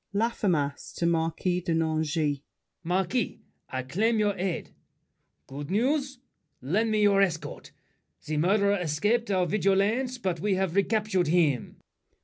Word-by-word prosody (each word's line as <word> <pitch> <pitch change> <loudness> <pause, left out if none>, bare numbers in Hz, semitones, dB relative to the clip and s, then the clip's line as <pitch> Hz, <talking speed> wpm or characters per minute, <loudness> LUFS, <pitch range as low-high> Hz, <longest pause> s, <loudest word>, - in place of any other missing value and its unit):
LAFFEMAS 185 -10 -1
(to 170 - -1
Marquis 170 +2 0
de 170 -2 -1
Nangis). 155 -2 0 0.4
Marquis, 185 +7 -1 0.3
I 130 0 -3
claim 215 - +1
your 205 -2 +1
aid. 185 -2 -3 0.7
Good 140 +2 -7
news! 270 +6 0 0.4
Lend 205 - 0
me 215 -1 +2
your 200 -1 +5
escort. 165 -6 -2 0.6
The 155 0 -2
murderer 200 +4 +3
escaped 205 +9 0
Our 185 -2 +2
vigilance, 210 +7 +1
but 185 -8 -2
we've 190 -2 0
recaptured 200 -3 +1
him. 155 -6 +1
185 Hz, 125 wpm, -27 LUFS, 160-210 Hz, 0.7 s, your